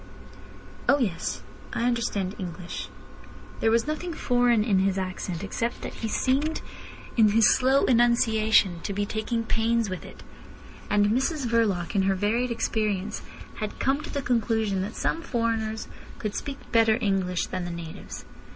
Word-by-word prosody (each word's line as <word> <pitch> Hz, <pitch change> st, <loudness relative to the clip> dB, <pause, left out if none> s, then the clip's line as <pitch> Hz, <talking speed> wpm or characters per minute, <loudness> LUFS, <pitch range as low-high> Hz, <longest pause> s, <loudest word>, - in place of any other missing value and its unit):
"Oh 280 Hz, -, +6 dB
yes. 190 Hz, -10 st, -2 dB, 0.3 s
I -, -, -1 dB
understand 235 Hz, -6 st, 0 dB
English." 180 Hz, -1 st, -6 dB, 0.7 s
There 225 Hz, -, +3 dB
was 230 Hz, +1 st, +3 dB
nothing 320 Hz, +3 st, -3 dB
foreign 245 Hz, -6 st, +3 dB
in 205 Hz, -4 st, +2 dB
his 195 Hz, 0 st, +1 dB
accent, 185 Hz, -1 st, -3 dB
except 230 Hz, +4 st, -3 dB
that -, -, -5 dB
he 225 Hz, -, -4 dB
seemed 275 Hz, +7 st, 0 dB, 0.5 s
in 220 Hz, -2 st, +6 dB
his 220 Hz, +1 st, +5 dB
slow 265 Hz, +2 st, +3 dB
enunciation 220 Hz, -6 st, +4 dB
to 200 Hz, -, -3 dB
be 205 Hz, +1 st, -1 dB
taking 220 Hz, +2 st, -2 dB
pains 225 Hz, -1 st, +1 dB
with 185 Hz, -, -5 dB
it. -, -, -12 dB, 0.7 s
And 205 Hz, 0 st, +3 dB
Mrs 265 Hz, +4 st, 0 dB
Verloc, 220 Hz, -7 st, +1 dB
in 195 Hz, -, +3 dB
her 195 Hz, -, +2 dB
varied 220 Hz, +6 st, +1 dB
experience, 215 Hz, -3 st, -1 dB, 0.4 s
had 215 Hz, -1 st, -4 dB
come 275 Hz, +2 st, +1 dB
to 310 Hz, -, -8 dB
the 280 Hz, -2 st, -3 dB
conclusion 220 Hz, -5 st, +1 dB
that 205 Hz, +4 st, -4 dB
some 330 Hz, -, -1 dB
foreigners 225 Hz, -5 st, -1 dB, 0.3 s
could 210 Hz, -2 st, -3 dB
speak 280 Hz, +4 st, -4 dB
better 225 Hz, -1 st, +4 dB
English 190 Hz, -5 st, 0 dB
than 185 Hz, -1 st, -4 dB
the 175 Hz, -, -4 dB
natives. 170 Hz, -2 st, -8 dB
220 Hz, 155 wpm, -26 LUFS, 195-240 Hz, 0.7 s, Oh